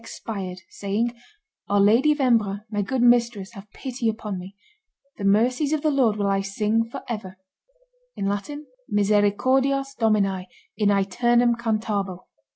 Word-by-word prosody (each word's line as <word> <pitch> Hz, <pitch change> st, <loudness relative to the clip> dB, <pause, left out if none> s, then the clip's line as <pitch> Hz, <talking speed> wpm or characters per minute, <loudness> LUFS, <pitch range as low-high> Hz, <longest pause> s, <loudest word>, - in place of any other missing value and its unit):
expired, 195 Hz, -5 st, -6 dB
saying, 210 Hz, +4 st, -2 dB, 0.6 s
"Our 205 Hz, 0 st, +3 dB
Lady 230 Hz, +9 st, +5 dB
of 300 Hz, -, +1 dB
Embrun, 215 Hz, -6 st, +2 dB
my 205 Hz, -1 st, 0 dB
good 245 Hz, +5 st, -1 dB
mistress, 235 Hz, -5 st, +3 dB
have 205 Hz, -2 st, -12 dB
pity 245 Hz, 0 st, -3 dB
upon 215 Hz, -3 st, -4 dB
me; 185 Hz, +2 st, -10 dB, 0.6 s
the -, -, -5 dB
mercies 250 Hz, +9 st, +2 dB
of 305 Hz, -, -1 dB
the 310 Hz, -, +3 dB
Lord 255 Hz, -7 st, +2 dB
will 205 Hz, -1 st, -1 dB
I 195 Hz, 0 st, +1 dB
sing 210 Hz, +3 st, 0 dB
forever 210 Hz, -6 st, -6 dB, 0.8 s
(misericordias 255 Hz, +3 st, 0 dB
Domini 195 Hz, -5 st, +1 dB, 0.3 s
in 205 Hz, 0 st, +2 dB
ceternum 240 Hz, +5 st, +3 dB
cantabo)." 215 Hz, -5 st, -2 dB
215 Hz, 130 wpm, -24 LUFS, 200-245 Hz, 0.8 s, Lady